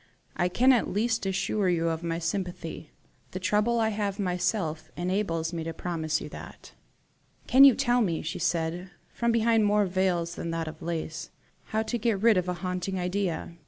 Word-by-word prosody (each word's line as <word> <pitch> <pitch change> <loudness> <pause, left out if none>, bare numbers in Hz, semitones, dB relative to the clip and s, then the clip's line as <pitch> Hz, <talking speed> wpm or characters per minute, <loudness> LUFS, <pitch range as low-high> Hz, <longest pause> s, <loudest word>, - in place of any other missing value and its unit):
I 180 - +1
can 255 +8 +5
at 240 - +2
least 225 +1 0
assure 195 +1 0
you 165 -1 +1
of 165 0 -2
my 165 -1 -2
sympathy. 170 -2 -4 0.4
The 185 - -3
trouble 210 +5 +1
I 220 -1 +2
have 205 -2 -2
myself 180 -4 -1
had 175 - -4
enables 175 -3 -1
me 165 -1 -3
to 165 0 -5
promise 160 -2 -2
you - - -7
that." - - -11 0.7
"Can 265 +2 +7
you 270 -4 +8
tell 245 -2 +2
me," 170 -7 0
she 160 - -4
said, 175 +1 -1 0.2
from 235 0 +1
behind 230 -1 +3
more 205 0 +3
veils 180 -2 0
than 170 - -5
that 165 -1 -2
of 155 0 -8
lace, 160 -2 -4 0.4
"how 220 0 -1
to 240 +1 -3
get 220 -3 +1
rid 225 +1 +5
of 180 0 0
a 180 - -1
haunting 185 +1 -2
idea?" 180 -2 -2
180 Hz, 190 wpm, -27 LUFS, 165-210 Hz, 0.7 s, you